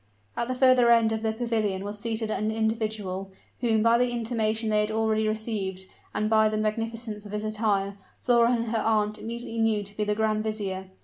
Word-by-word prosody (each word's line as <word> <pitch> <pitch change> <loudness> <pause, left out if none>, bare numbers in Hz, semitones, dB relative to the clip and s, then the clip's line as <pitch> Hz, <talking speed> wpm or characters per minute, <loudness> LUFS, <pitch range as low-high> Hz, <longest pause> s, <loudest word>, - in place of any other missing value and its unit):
At 235 - -1
the 255 - -2
further 255 -2 +5
end 230 -1 +5
of 220 0 -2
the 220 -1 0
pavilion 220 -4 -1
was 205 +1 -5
seated 220 0 -2
an 215 0 -1
individual, 220 -4 -2 0.3
whom, 220 -3 +2
by 230 +1 +4
the 250 0 +2
intimation 225 -2 -1
they 210 - +3
had 210 - -1
already 220 0 +1
received, 210 -4 -2 0.3
and 215 - -1
by 220 0 +4
the 215 - -2
magnificence 220 0 -2
of 205 - -10
his 210 0 -2
attire, 205 -2 -1 0.2
Flora 235 -1 +4
and 235 -1 0
her 225 - +1
aunt 215 -1 +1
immediately 230 0 -5
knew 220 -2 +2
to 200 +1 -9
be 210 - -1
the 210 0 0
grand 215 0 +1
vizier. 195 -3 -3
220 Hz, 200 wpm, -26 LUFS, 210-230 Hz, 0.3 s, further